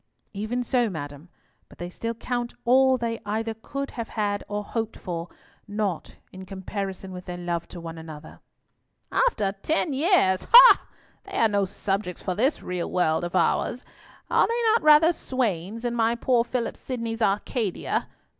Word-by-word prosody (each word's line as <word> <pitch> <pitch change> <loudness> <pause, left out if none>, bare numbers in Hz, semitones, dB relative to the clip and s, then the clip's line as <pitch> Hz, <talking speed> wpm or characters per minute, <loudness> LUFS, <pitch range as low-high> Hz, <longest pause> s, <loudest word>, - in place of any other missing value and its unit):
"Even 220 +5 -2
so, 240 -1 +1
madam; 145 -1 -7 0.4
but - - -17
they 175 - -5
still 230 +5 -4
count 240 +1 -3
all 260 +2 +5
they 230 -1 -3
either 220 +2 -2
could 275 +5 -6
have 230 -3 -5
had 205 -2 -1
or 205 0 -3
hoped 225 +1 -4
for, 170 -2 -5 0.4
nought 205 -4 -3 0.2
in 185 0 -9
comparison 190 0 -5
with 180 0 -8
their 180 -1 -6
love 175 -1 -3
to 175 - -9
one 165 -1 -7
another." 155 -1 -10 0.7
"After 210 - +2
ten 315 -1 0
years! 270 - +2
Ha! - - +10 0.4
They 395 -1 -6
are 225 - +5
no 200 -2 +1
subjects 195 -1 -3
for 185 - -1
this 255 - 0
real 180 -1 -3
world 160 -2 +1
of 175 +1 -4
ours; 240 +6 +1 0.4
are - - +3
they 470 +1 -1
not 460 - +3
rather 305 +2 +6
swains 225 - -2
in 240 - 0
my 230 0 +2
poor 235 0 +2
Philip 240 0 -3
Sidney's 230 -3 -4
Arcadia? 210 0 -1
215 Hz, 165 wpm, -25 LUFS, 185-245 Hz, 0.7 s, Ha